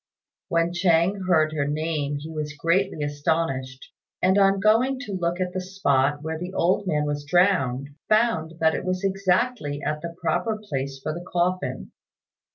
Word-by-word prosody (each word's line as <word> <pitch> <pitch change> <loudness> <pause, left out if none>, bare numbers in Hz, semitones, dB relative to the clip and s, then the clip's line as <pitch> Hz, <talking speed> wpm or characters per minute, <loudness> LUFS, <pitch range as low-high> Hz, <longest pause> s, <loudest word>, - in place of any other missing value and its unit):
When 170 +1 +1
Chang 175 +2 +2
heard 155 -4 +3
her 145 -2 -1
name 150 -1 -1
he 155 +3 -8
was 150 -2 -4
greatly 170 +1 +1
astonished; 145 -3 -2 0.3
and 185 +1 +3
on 195 0 +4
going 225 +6 +3
to 245 - -7
look 175 -2 -1
at 180 -1 -2
the 185 - -2
spot 145 -7 +1
where 160 0 -3
the 180 +2 -6
old 185 +3 +1
man 150 -4 +1
was 145 0 -2
drowned, 145 -5 +2 0.2
found 215 -8 +2
that 160 0 +3
it - - -3
was 185 0 -2
exactly 195 -4 0
at 150 0 -2
the 170 +1 -6
proper 175 +7 0
place 140 -9 -4
for 155 +3 -3
the 175 +2 -7
coffin. 180 +1 -1
170 Hz, 165 wpm, -24 LUFS, 150-190 Hz, 0.3 s, on